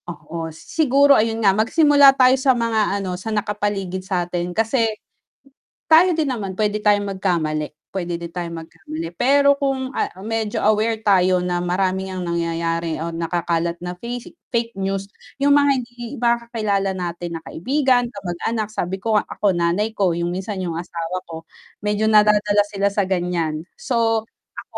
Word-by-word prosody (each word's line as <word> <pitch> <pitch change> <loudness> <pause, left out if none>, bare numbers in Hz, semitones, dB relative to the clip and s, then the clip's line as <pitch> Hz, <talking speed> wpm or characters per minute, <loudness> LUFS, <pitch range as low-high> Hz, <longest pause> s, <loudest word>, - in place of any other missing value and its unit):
Oo, 165 0 -6
siguro 280 - +3
ayun 225 -2 +1
nga 195 - +6
magsimula 285 - +5
tayo 255 0 +6
sa 260 -1 +2
mga 220 -3 +1
ano, 190 -2 -3
sa 225 - -5
nakapaligid 205 -3 -2
satin 175 -2 -2
kasi 225 +5 +1 1.0
tayo 340 +3 +6
din 315 -3 0
naman 205 -7 -3
pwede 210 +1 0
tayong 205 -1 +2
magkamali, 160 -6 -1 0.2
pwede 175 -3 -4
din 170 - -5
tayong 170 -1 -5
magkamali. 165 0 -7
Pero 280 +2 +4
kung, 270 -2 -1
ah, - - -1
medyo 220 0 -2
aware 215 +1 +1
tayo 185 -3 +3
na 180 0 -1
marami 185 +2 -1
ang 185 - -4
nangyayari 170 -1 -2
o 165 - -2
nakakalat 170 0 -2
na 180 0 -5
face 240 +4 -6 0.2
fake 230 -3 -1
news, 195 0 -2 0.3
'yung 285 0 +5
mga 285 0 +4
hindi 240 -2 -6
mga 235 0 +3
kakilala 200 -4 0
natin 175 -1 -4
na - - -11
kaibigan, 260 - +1
kamag-anak, 200 +3 -3
sabi 190 -3 -4
ko 220 0 +2
ako 200 -2 0
nanay 175 +6 +1
ko, 190 -4 +2
'yung 170 +1 -2
minsan 190 +2 -4
'yung 170 -3 -3
asawa 170 +1 -4
ko, 165 0 -10 0.3
medyo 210 +1 0
nadadala 210 -1 +4
sila 200 -1 0
sa 205 - +2
gan'yan. 175 -4 -1
So, 225 -2 0 0.2
ako - - -9
200 Hz, 155 wpm, -21 LUFS, 175-225 Hz, 1.0 s, nga